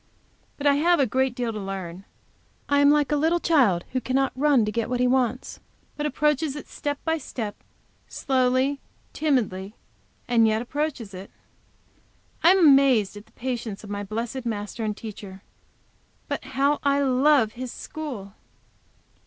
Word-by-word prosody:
But 285 Hz, -, -6 dB
I 285 Hz, -1 st, +5 dB
have 345 Hz, +3 st, +3 dB
a 275 Hz, -, +4 dB
great 260 Hz, +1 st, 0 dB
deal 240 Hz, -2 st, -2 dB
to 215 Hz, -, -5 dB
learn. 195 Hz, -2 st, -6 dB, 0.6 s
I 285 Hz, 0 st, +3 dB
am 285 Hz, 0 st, +6 dB
like 295 Hz, 0 st, +3 dB
a -, -, +3 dB
little 320 Hz, +4 st, +2 dB
child 245 Hz, -, +3 dB
who 255 Hz, -, -1 dB
cannot 265 Hz, +1 st, 0 dB
run 275 Hz, -4 st, +3 dB
to 210 Hz, -, -2 dB
get 230 Hz, +2 st, -2 dB
what 250 Hz, -1 st, -1 dB
he 250 Hz, -, +3 dB
wants, 250 Hz, -1 st, 0 dB, 0.4 s
but 295 Hz, 0 st, -2 dB
approaches 300 Hz, -1 st, 0 dB
it 295 Hz, -, -8 dB
step 290 Hz, -1 st, -4 dB
by 325 Hz, 0 st, 0 dB
step, 225 Hz, -6 st, -5 dB, 0.5 s
slowly, 260 Hz, +1 st, +1 dB, 0.3 s
timidly 215 Hz, -9 st, -1 dB, 0.5 s
and 230 Hz, -2 st, +4 dB
yet 220 Hz, 0 st, +1 dB
approaches 250 Hz, -4 st, -3 dB
it. 190 Hz, +2 st, -9 dB, 1.1 s
I 335 Hz, -, +6 dB
am 380 Hz, -, +6 dB
amazed 270 Hz, -8 st, +5 dB
at 205 Hz, +1 st, -11 dB
the -, -, -25 dB
patience 235 Hz, -5 st, -4 dB
of 205 Hz, -, -9 dB
my 205 Hz, 0 st, -3 dB
blessed 230 Hz, +5 st, -4 dB
Master 220 Hz, -1 st, -4 dB
and 210 Hz, -1 st, -2 dB
Teacher, 200 Hz, -3 st, -9 dB, 0.8 s
but -, -, -4 dB
how 285 Hz, +2 st, +3 dB
I 280 Hz, 0 st, +2 dB
love 270 Hz, -3 st, +3 dB
His 250 Hz, +1 st, -6 dB
school! 245 Hz, -11 st, -7 dB
255 Hz, 160 wpm, -25 LUFS, 215-285 Hz, 1.1 s, am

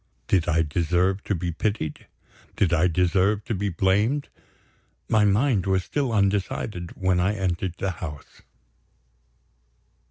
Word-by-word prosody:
Did 90 Hz, -3 st, +2 dB
I 80 Hz, 0 st, +3 dB
deserve 90 Hz, +5 st, 0 dB
to 105 Hz, -, 0 dB
be 85 Hz, 0 st, -2 dB
pitied? 85 Hz, -2 st, -3 dB, 0.5 s
did 90 Hz, -4 st, +2 dB
I 85 Hz, +1 st, +4 dB
deserve 95 Hz, +4 st, +1 dB
to -, -, -2 dB
be 100 Hz, 0 st, -1 dB
blamed? 100 Hz, -, +1 dB, 0.8 s
my 110 Hz, -1 st, +3 dB
mind 105 Hz, -1 st, +2 dB
was 95 Hz, -1 st, +2 dB
still 135 Hz, +6 st, -1 dB
undecided 100 Hz, -3 st, -1 dB
when 95 Hz, -1 st, +2 dB
I 95 Hz, +4 st, +1 dB
entered 90 Hz, -2 st, -2 dB
the 95 Hz, -, -1 dB
house. 75 Hz, -6 st, -9 dB
95 Hz, 130 wpm, -25 LUFS, 85-105 Hz, 0.8 s, I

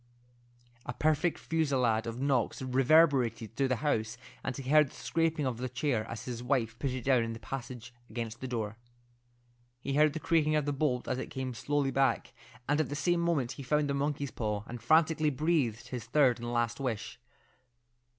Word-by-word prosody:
A 125 Hz, -, -3 dB
perfect 155 Hz, +5 st, +1 dB
fusillade 130 Hz, -8 st, +1 dB
of 115 Hz, +1 st, -5 dB
knocks 135 Hz, -4 st, +1 dB
reverberated 130 Hz, -4 st, +3 dB
through 135 Hz, +1 st, +1 dB
the 130 Hz, -, +1 dB
house, 110 Hz, -5 st, 0 dB, 0.3 s
and 135 Hz, -, -3 dB
he 135 Hz, -2 st, -7 dB
heard 150 Hz, 0 st, +5 dB
the -, -, -16 dB
scraping 165 Hz, -3 st, 0 dB
of 125 Hz, -2 st, -2 dB
a 130 Hz, -, -2 dB
chair 125 Hz, -3 st, -1 dB
as 115 Hz, -, -6 dB
his 120 Hz, -2 st, -5 dB
wife 120 Hz, -3 st, -1 dB
put 140 Hz, -, -1 dB
it 125 Hz, -1 st, -4 dB
down 130 Hz, -2 st, +4 dB
in 115 Hz, 0 st, -3 dB
the 115 Hz, -, -8 dB
passage 125 Hz, -2 st, -7 dB, 0.2 s
against 115 Hz, -1 st, -5 dB
the 130 Hz, -, -4 dB
door. 110 Hz, -3 st, -3 dB, 1.0 s
He 135 Hz, -, -3 dB
heard 150 Hz, +1 st, +4 dB
the 160 Hz, -, -3 dB
creaking 155 Hz, -1 st, +2 dB
of 150 Hz, -2 st, +1 dB
the 145 Hz, -, 0 dB
bolt 135 Hz, -3 st, 0 dB
as 130 Hz, -, -1 dB
it -, -, -4 dB
came 130 Hz, -1 st, -4 dB
slowly 140 Hz, +4 st, 0 dB
back, 135 Hz, -2 st, +1 dB, 0.3 s
and 145 Hz, +2 st, +2 dB
at 155 Hz, -, -3 dB
the 145 Hz, -, -3 dB
same 175 Hz, +3 st, +1 dB
moment 165 Hz, -8 st, 0 dB
he -, -, -8 dB
found 150 Hz, +2 st, +1 dB
the -, -, 0 dB
monkey's 140 Hz, 0 st, -1 dB
paw, 105 Hz, -2 st, -2 dB
and 120 Hz, 0 st, -8 dB
frantically 155 Hz, +4 st, +3 dB
breathed 135 Hz, -6 st, 0 dB
his 125 Hz, -4 st, -5 dB
third 130 Hz, -1 st, +3 dB
and 120 Hz, 0 st, -4 dB
last 120 Hz, 0 st, 0 dB
wish. 120 Hz, -3 st, -4 dB
130 Hz, 195 wpm, -31 LUFS, 120-150 Hz, 1.0 s, heard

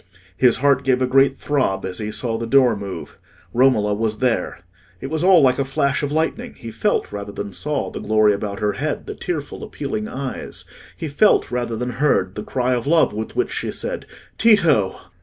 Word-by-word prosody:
His 125 Hz, -2 st, +4 dB
heart 140 Hz, +1 st, +2 dB
gave 130 Hz, -2 st, +2 dB
a 130 Hz, -, +2 dB
great 135 Hz, +1 st, +3 dB
throb 130 Hz, -10 st, 0 dB
as 95 Hz, -1 st, -5 dB
he 105 Hz, -1 st, -3 dB
saw 115 Hz, +2 st, -2 dB
the 115 Hz, -, -4 dB
door 125 Hz, -2 st, +4 dB
move: 100 Hz, -2 st, -7 dB, 0.3 s
Romola 120 Hz, -5 st, +3 dB
was 110 Hz, 0 st, -1 dB
there. 120 Hz, -7 st, -1 dB, 0.4 s
It 135 Hz, -, -6 dB
was 160 Hz, +1 st, -1 dB
all 185 Hz, -3 st, +6 dB
like 130 Hz, 0 st, +3 dB
a -, -, +2 dB
flash 135 Hz, +1 st, 0 dB
of 145 Hz, -1 st, -2 dB
lightning: 165 Hz, +10 st, -2 dB
he 115 Hz, -, -9 dB
felt, 205 Hz, -, 0 dB
rather 100 Hz, 0 st, -6 dB
than 100 Hz, 0 st, -6 dB
saw, 150 Hz, +7 st, -2 dB
the -, -, -6 dB
glory 110 Hz, 0 st, +3 dB
about 100 Hz, 0 st, -4 dB
her 105 Hz, -1 st, +1 dB
head, 150 Hz, +2 st, -3 dB
the -, -, -5 dB
tearful 155 Hz, -5 st, -5 dB
appealing 110 Hz, -7 st, -4 dB
eyes; 135 Hz, -1 st, -6 dB, 0.3 s
he 160 Hz, -, -4 dB
felt, 150 Hz, +1 st, +3 dB
rather 120 Hz, -2 st, -2 dB
than 125 Hz, +2 st, -3 dB
heard, 120 Hz, -8 st, +1 dB
the 105 Hz, -, -5 dB
cry 125 Hz, +3 st, -1 dB
of 120 Hz, +1 st, -2 dB
love 160 Hz, -7 st, +3 dB
with 110 Hz, +1 st, -5 dB
which 375 Hz, -, 0 dB
she -, -, -3 dB
said, -, -, -4 dB, 0.3 s
"Tito!" 170 Hz, -, +4 dB
125 Hz, 200 wpm, -21 LUFS, 105-145 Hz, 0.4 s, all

